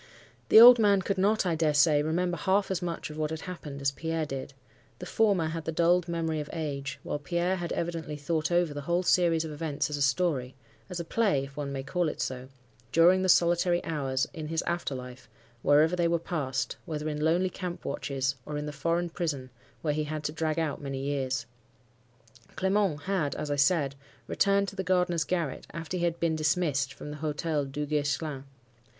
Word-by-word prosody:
The - - +9
old 245 +1 +11
man 200 -3 +4
could 195 +1 -1
not, 205 +2 +2
I 175 - +1
dare 155 -2 +1
say, 145 0 +5
remember 175 +3 0
half 195 +4 +1
as 190 - -1
much 170 -3 -4
of 150 - -9
what 155 -1 0
had 160 0 -5
happened 150 -6 -7
as 140 - +2
Pierre 160 +2 -2
did; 135 -1 -6 0.5
the 180 - -8
former 195 -5 +2
had 160 0 -5
the 165 - -1
dulled 170 +2 +3
memory 165 -2 -1
of 150 - -5
age, 140 -4 -4
while 145 - -3
Pierre 175 +5 -1
had 175 -1 -4
evidently 165 -3 -3
thought 160 +2 -1
over 175 -3 +2
the 145 - -5
whole 175 +5 0
series 170 -3 +3
of 160 - -6
events 150 -1 -2
as 145 - -2
a - - -4
story—as 135 +1 -2
a 170 - -4
play, 195 -8 +1
if 135 0 -10
one 145 -2 -4
may 135 -1 -4
call 170 +4 0
it - - -7
so—during 130 +7 0
the 185 - 0
solitary 175 0 +4
hours 135 -4 -1
in 160 -3 -6
his 160 +1 -1
after 170 -5 -2
life, 125 0 -9 0.3
wherever 155 +4 +4
they 175 -1 +2
were 170 0 +2
passed, 155 -5 -3
whether 155 -1 -4
in 150 -1 -3
lonely 175 +4 +2
camp 180 -2 -6
watches, 135 -2 -1
or 150 +2 -5
in 150 - -3
the 150 - -4
foreign 170 +4 -1
prison, 145 -8 -3 0.3
where 150 -2 +1
he 155 0 -1
had 155 0 -4
to 150 - -2
drag 160 0 -2
out 160 -3 -1
many 135 -1 -4
years. 130 -3 -1 1.1
Clement 190 -5 +1
had, 185 -7 -1
as 150 - -4
I - - +1
said, 145 -1 +2 0.3
returned 200 0 +2
to - - -13
the 190 - -2
gardener's 180 -2 +1
garret 165 -3 -2
after 165 +1 -4
he 175 -1 0
had 170 0 -1
been 165 -1 +1
dismissed 150 -3 +1
from 150 - -8
the 150 - -7
Hotel 150 0 -1
Duguesclin. 145 0 -2
160 Hz, 200 wpm, -28 LUFS, 145-175 Hz, 1.1 s, old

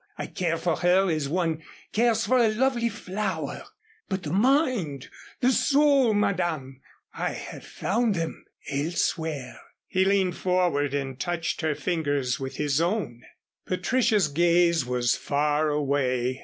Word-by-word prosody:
I - - -4
care 170 -3 -2
for 165 -1 -1
her 185 +1 +3
as 155 -3 -1
one 165 -1 -1 0.3
cares 225 0 +2
for 255 0 +3
a 235 - +5
lovely 235 0 +1
flower 190 -7 -4 0.4
but 190 -1 -2
the 150 0 -4
mind 225 - +1 0.3
the 255 +1 +4
soul, 275 -4 +3
Madame, 160 -10 -1 0.3
I - - -2
have - - -8
found 225 0 -1
them 165 -2 -4 0.2
elsewhere," 145 -4 -2 0.3
he 185 - +1
leaned 190 -2 +1
forward 175 -7 +1
and 135 -2 -4
touched 175 -2 -2
her 155 -2 0
fingers 145 -8 -1
with 135 0 -5
his 150 0 +1
own. 170 - -1 0.5
Patricia's 205 +1 +2
gaze 170 -1 +3
was 125 -1 +1
far 150 +1 0
away. 135 -3 0
170 Hz, 135 wpm, -26 LUFS, 145-200 Hz, 0.5 s, a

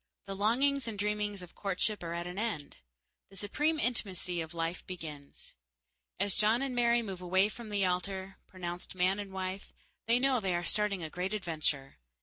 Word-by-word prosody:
The 195 0 -4
longings 255 +6 +3
and 220 -2 -3
dreamings 205 -1 0
of 180 - -12
courtship 200 +2 0
are 170 -1 -3
at 170 0 -2
an 180 +2 -4
end. 210 -11 -2 0.5
The 195 - -15
supreme 295 - +1
intimacy 190 - 0
of 165 +1 -6
life 165 +1 -1
begins. 155 -6 -8 0.7
As 200 0 +2
John 220 +6 +4
and 270 -2 -1
Mary 235 -1 +4
move 190 -4 -5
away 185 +3 +4
from 230 0 -8
the 200 -2 +2
altar, 190 +1 -1
pronounced 175 -1 -5
man 185 +2 +3
and 200 -1 -5
wife, 190 0 -4 0.4
they 230 +1 +6
know 260 0 +3
they 190 -4 +1
are 175 - 0
starting 200 -1 +1
a 155 - -4
great 185 +4 -1
adventure. 155 -7 -1
195 Hz, 180 wpm, -32 LUFS, 180-215 Hz, 0.7 s, they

